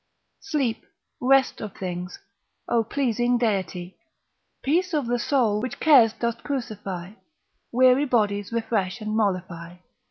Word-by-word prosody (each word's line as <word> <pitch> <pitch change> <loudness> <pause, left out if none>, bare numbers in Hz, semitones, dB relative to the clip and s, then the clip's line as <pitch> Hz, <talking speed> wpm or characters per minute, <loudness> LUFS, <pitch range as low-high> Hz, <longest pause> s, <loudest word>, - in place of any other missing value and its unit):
Sleep, 265 - -2 0.4
rest 265 +1 +3
of 210 -3 -7
things, 180 -1 -5 0.5
O 235 -1 +2
pleasing 245 0 0
deity, 190 -5 -2 0.7
Peace 350 +5 +1
of 290 -4 0
the 240 +1 0
soul, 235 -6 +1
which 255 - -5
cares 265 -8 +6
dost 235 0 -3
crucify, 205 -10 -5 0.6
Weary 255 +3 +5
bodies 205 -6 0
refresh 225 -3 -1
and 215 0 -3
mollify. 185 -5 -2
230 Hz, 120 wpm, -24 LUFS, 200-255 Hz, 0.7 s, cares